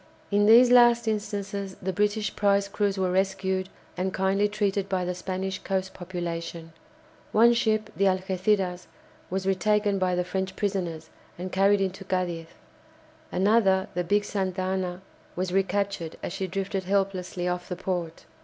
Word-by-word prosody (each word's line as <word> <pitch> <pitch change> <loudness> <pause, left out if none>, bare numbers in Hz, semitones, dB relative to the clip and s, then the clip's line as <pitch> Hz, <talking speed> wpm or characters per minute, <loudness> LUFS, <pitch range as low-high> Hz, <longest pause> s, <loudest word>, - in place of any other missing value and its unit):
In 205 +1 +3
these 240 +3 +8
last 240 -1 +6
instances 200 -2 -3
the 190 +1 -3
British 210 +2 0
prize 200 -1 +2
crews 200 0 -1
were 185 -1 +1
rescued 190 0 0 0.3
and 185 +1 -1
kindly 190 +2 +1
treated 200 -2 -1
by 185 -2 0
the 180 - -1
Spanish 185 +1 -4
coast 190 -1 -2
population. 170 -2 -5 0.6
One 235 +2 +6
ship, 215 -2 0
the 195 +4 +2
"Algéciras," 185 -1 0 0.4
was 190 +1 -2
retaken 200 +1 +2
by 185 -1 +1
the 180 - +1
French 190 +1 -3
prisoners, 175 -6 -3 0.3
and 180 +1 -5
carried 195 +1 +3
into 190 0 -2
Cadiz. 180 -3 -2 0.8
Another, 195 0 +3
the 180 - -1
big 205 +4 +2
"Santa 190 -2 -2
Ana," 185 -1 -2 0.3
was 180 0 -2
recaptured 195 -3 -1
as - - -4
she 195 -1 -3
drifted 195 0 -3
helplessly 190 -2 -1
off 180 0 -3
the 180 - -2
port. 175 -3 -4
190 Hz, 150 wpm, -26 LUFS, 180-200 Hz, 0.8 s, these